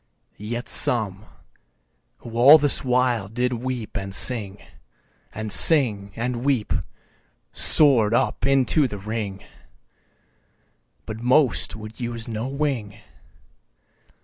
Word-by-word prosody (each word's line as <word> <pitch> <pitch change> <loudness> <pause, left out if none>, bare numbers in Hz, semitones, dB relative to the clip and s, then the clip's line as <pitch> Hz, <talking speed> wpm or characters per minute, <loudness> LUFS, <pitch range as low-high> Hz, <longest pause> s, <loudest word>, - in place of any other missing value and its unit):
4. 105 - -13
Yet 120 0 -6
some, 105 -1 0 1.0
who 120 - -11
all 135 +6 +7
this 145 -2 0
while 125 -5 -1
did 125 +3 -3
weep 125 -1 -6
and 95 0 -5
sing, 105 -5 +1 0.7
And 110 -1 -7
sing, 105 -9 +5
and 120 +1 -5
weep, 130 -6 -1 0.8
soar'd 120 -8 +4
up - - -2
into 135 +2 +1
the 105 - -8
Ring, 105 -1 -7 1.6
But 110 0 -8
most 125 - +1
would 110 0 -12
use 120 -2 -5
no 115 +1 -5
wing. 135 -7 -4
115 Hz, 110 wpm, -21 LUFS, 105-130 Hz, 1.6 s, all